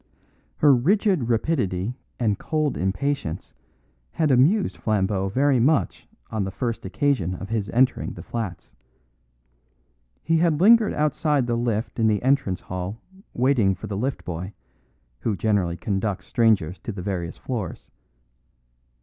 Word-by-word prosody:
Her 145 - +6
rigid 180 - +2
rapidity 115 - 0 0.3
and 105 -5 +1
cold 155 -3 -1
impatience 95 - -2 0.6
had 155 -3 +1
amused 155 - +3
Flambeau 95 -2 0
very 135 +4 +2
much 140 +6 +1 0.2
on 110 -2 -1
the 95 - -3
first 115 +2 -3
occasion 95 - 0
of 95 +2 -8
his 110 -4 -2
entering 125 +5 +1
the - - -9
flats. 95 - -5 1.5
He 165 0 +2
had 160 -2 +2
lingered 220 +3 +6
outside 150 -2 +1
the 120 -1 0
lift 115 -1 -2
in 110 - +3
the 105 0 +1
entrance 130 -9 +1
hall 90 +4 -5 0.4
waiting 120 -7 +3
for 95 - -9
the 105 -2 -4
lift 130 +7 -3
boy, 90 +3 -5 0.7
who 110 - -1
generally 95 -3 0
conducts 95 0 -2
strangers 100 -7 +2
to - - -5
the 95 -3 -7
various 90 -4 -3
floors. 110 -10 -5
115 Hz, 135 wpm, -24 LUFS, 95-140 Hz, 1.5 s, Her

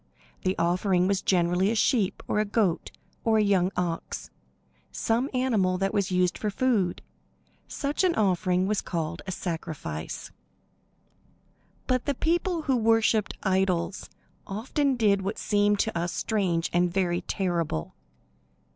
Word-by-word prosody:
The 185 +1 -1
offering 180 +2 +2
was 195 -1 +1
generally 180 +1 +2
a 225 - 0
sheep, 215 -3 +1
or - - +1
a - - +3
goat, 205 -5 0 0.3
or 225 -1 +3
a 215 - +4
young 190 -2 +2
ox 175 -2 -3 0.6
some 235 +5 0
animal 225 -8 +1
that 195 +1 -1
was 200 -2 +1
used 180 -1 +1
for 215 - -1
food. 210 -5 0 0.6
Such 290 +5 -2
an 360 -2 +3
offering 185 -2 +2
was 210 +1 0
called 165 -1 -3
"a - - -2
sacrifice." 160 - -5 1.5
But 255 -1 0
the 285 - 0
people 340 +3 0
who 270 -4 +2
worshipped 225 -1 +2
idols 190 -2 0 0.4
often 260 +7 0
did 205 -4 +3
what 195 +3 -3
seems 205 0 +2
to 220 - -4
us 170 +1 -1
strange 185 -6 0
and 175 0 +2
very 175 -2 0
terrible. 170 - -2
195 Hz, 140 wpm, -27 LUFS, 180-225 Hz, 1.5 s, a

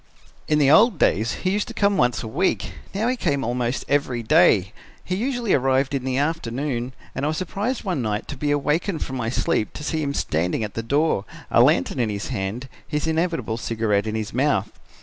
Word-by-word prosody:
"In 150 - +3
the 140 -2 +4
old 210 +4 +6
days 110 -1 +2
he 185 - +3
used 205 +1 0
to - - -8
come 200 0 +2
once 125 -7 +1
a - - -5
week; 165 +12 0 0.2
now 210 +4 -1
he 255 - +1
came 145 - 0
almost 120 +2 -1
every 130 -4 0
day. 110 - +4 0.3
He 185 - -3
usually 240 0 0
arrived 135 +1 +2
in 135 -2 -2
the 130 -1 -1
afternoon 135 -4 -2 0.2
and - - -4
I - - +2
was 155 0 -1
surprised 205 +9 -2
one 180 - -1
night 105 -2 -2
to 145 - -4
be 145 +2 -2
awakened 150 +5 0
from 130 - -5
my 115 -2 -2
sleep 125 -3 0
to 150 - -7
see 155 +1 -1
him 140 -1 -2
standing 85 +7 0
at 105 - -5
the 115 - -3
door, 140 -3 +1 0.3
a - - +6
lantern 90 +9 +3
in 115 -3 +1
his 100 +2 -4
hand, 115 +2 -3 0.2
his 150 0 -2
inevitable 160 -8 -1
cigarette 110 -3 0
in 110 - -2
his 110 -2 -4
mouth. 125 -6 +1
135 Hz, 210 wpm, -23 LUFS, 115-160 Hz, 0.3 s, old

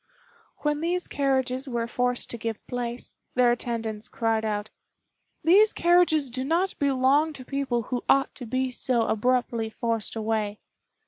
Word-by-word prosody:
When 295 0 0
these 350 +2 -1
carriages 265 -1 0
were 235 -2 -1
forced 245 +1 0
to 235 - -4
give 225 -1 -4
place, 245 -1 -4 0.2
their 250 -1 +5
attendants 230 -2 -3
cried 225 -2 0
out, 210 -1 -2 0.7
"These 410 +6 +6
carriages 340 -6 +3
do 255 +2 -3
not 340 +7 +1
belong 280 +3 +3
to 260 -3 -9
people 265 -4 -1
who 245 +2 -3
ought 275 0 +3
to 245 - -9
be 255 +2 -1
so 250 -2 +1
abruptly 235 0 0
forced 230 -1 -2
away." 215 -2 -1
250 Hz, 145 wpm, -26 LUFS, 230-275 Hz, 0.7 s, These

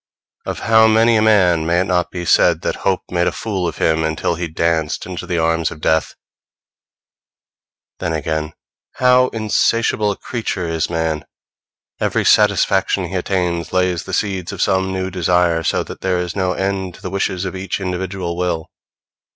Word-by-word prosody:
Of - - -4
how 110 0 +5
many 115 +1 +4
a 110 - +3
man 95 -7 +4
may 85 +1 +2
it - - 0
not 90 -2 0
be 90 -1 -5
said 75 - +4
that - - -1
hope 95 -1 0
made 90 -1 +1
a - - +2
fool 95 -5 -3
of 80 - -5
him 80 0 +1
until 80 +2 -1
he 85 +1 -3
danced 80 -1 -1
into 90 0 -6
the 90 -1 -1
arms 80 0 +1
of 80 - -10
death! 80 +1 0 1.8
Then 80 - -2
again, 80 0 -2 0.4
how 125 0 +4
insatiable 110 -1 +1
a 100 - -2
creature 105 -7 -3
is 80 -1 -1
man! 80 -2 -1 0.8
Every - - 0
satisfaction 95 -3 +3
he 95 - -5
attains 90 -2 -1
lays 90 -1 +1
the 95 - -7
seeds 95 -3 -1
of - - -8
some 95 0 +1
new 95 0 -3
desire, 90 -2 +2
so - - 0
that - - -10
there 95 -1 0
is 90 -1 -3
no 95 -2 0
end 95 -2 -2
to - - -17
the 95 - -5
wishes 95 -1 -1
of 95 - -4
each 95 +1 -3
individual 90 -1 -3
will. 90 -3 -2
90 Hz, 175 wpm, -18 LUFS, 85-95 Hz, 1.8 s, how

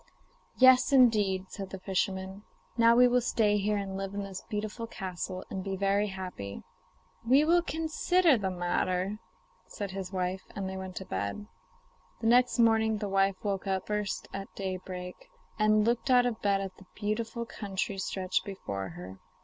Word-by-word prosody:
'Yes, 255 0 +6
indeed,' 210 -8 +4
said 195 -2 -6
the 195 - -7
fisherman. 190 +1 -2 0.3
'Now 230 0 +5
we 250 +1 +7
will 250 0 +3
stay 210 -3 +2
here 210 +1 +1
and 195 -1 -4
live 195 0 -4
in 200 - -2
this 195 -1 -7
beautiful 215 +2 -4
castle, 185 -2 -5
and 190 - -3
be 195 0 -3
very 200 +2 +1
happy.' 180 - -6 0.6
'We 265 +6 +5
will 345 +2 +4
consider 325 0 +2
the 200 -5 -1
matter,' 185 +2 -1 0.5
said 200 -2 -5
his 190 -1 -5
wife, 185 0 -2
and 195 -2 -3
they 190 - -5
went 190 -1 -6
to 190 - -5
bed. 100 - -3 0.7
The - - -6
next 245 +2 +4
morning 220 -2 +4
the 205 -1 -3
wife 195 0 +2
woke 200 -1 -2
up 190 -1 -1
first 210 -2 -2
at 195 0 -5
daybreak, 185 -1 -6 0.3
and 215 0 +4
looked 240 +3 0
out 250 -1 +6
of 245 - +1
the - - -32
bed 200 -1 +2
at 190 -1 -6
the 190 - -16
beautiful 225 +2 -2
country 195 -2 -4
stretched 185 -1 -1
before 100 - -5
her. 90 +3 -10
195 Hz, 175 wpm, -30 LUFS, 190-225 Hz, 0.7 s, we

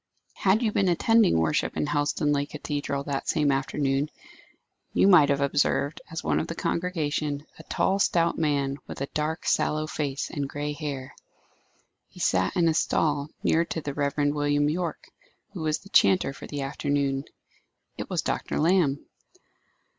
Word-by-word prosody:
Had 205 +5 +2
you 220 - +2
been 195 -2 +2
attending 220 - +4
worship 80 -2 0
in - - +1
Helstonleigh 145 0 0
Cathedral 145 -2 -3
that 140 -1 -3
same 150 -3 +2
afternoon, 135 +1 0 0.8
you - - +4
might 165 -7 +7
have 140 0 +1
observed, 140 +1 +1
as 160 - -5
one - - +1
of - - -3
the 165 - -5
congregation, 155 -4 -2
a - - -10
tall 195 +1 +1
stout 170 -3 +2
man, 140 -3 0
with - - -7
a - - 0
dark, 155 +2 -2
sallow 155 0 +1
face, 145 -3 -3
and 140 -2 -3
grey 145 +1 -3
hair. 140 -3 -5 0.9
He - - -16
sat 95 0 +1
in 170 -2 +3
a 160 - +3
stall 150 -2 +1
near 165 - +3
to 165 - -4
the 145 -2 -5
Reverend 145 0 0
William 145 0 +1
Yorke, 170 -1 -4 0.4
who 180 - -6
was 155 -1 0
the 200 - -16
chanter 185 -9 +4
for - - -10
the 145 -1 -4
afternoon. 140 0 -1 0.7
It - - -6
was - - -1
Dr. - - -2
Lamb. 160 -4 +2
145 Hz, 160 wpm, -26 LUFS, 140-165 Hz, 0.9 s, might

